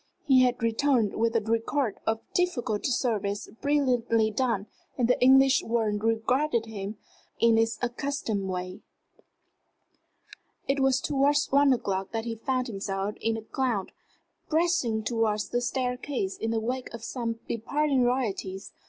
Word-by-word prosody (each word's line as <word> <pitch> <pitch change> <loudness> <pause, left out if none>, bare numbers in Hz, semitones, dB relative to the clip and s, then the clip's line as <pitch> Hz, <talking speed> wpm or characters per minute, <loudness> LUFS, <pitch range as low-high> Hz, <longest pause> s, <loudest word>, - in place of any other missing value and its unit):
He 265 -4 +6
had 250 -2 +1
returned 230 -1 +2
with 230 +1 0
a 230 - +3
record 225 +2 -1
of 225 0 0
difficult 250 -12 0
service 220 -6 -1
brilliantly 245 -6 +2
done, 225 -3 0 0.3
and 240 - +2
the 250 - +2
English 265 +1 +6
world 220 -2 0
rewarded 230 +3 +1
him 210 -1 -6 0.4
in 230 -1 +5
its 225 0 +1
accustomed 240 -5 -2
ways. 185 0 -4 1.9
It 275 +1 +1
was 270 0 +3
towards 285 +1 +2
one 280 0 +5
o'clock 195 -6 -1
that 225 0 -2
he 230 - -2
found 255 +3 -1
himself 195 -2 -3
in 225 0 0
a 220 - -7
crowd 230 -4 -2 0.6
pressing 315 -9 +1
towards 220 -2 0
the 245 - 0
staircase 250 -4 -2
in 225 - -3
the 225 0 0
wake 250 +3 -3
of 225 - -10
some 230 -2 -3
departing 275 +4 0
royalties. 210 -6 -2
230 Hz, 140 wpm, -27 LUFS, 220-265 Hz, 1.9 s, He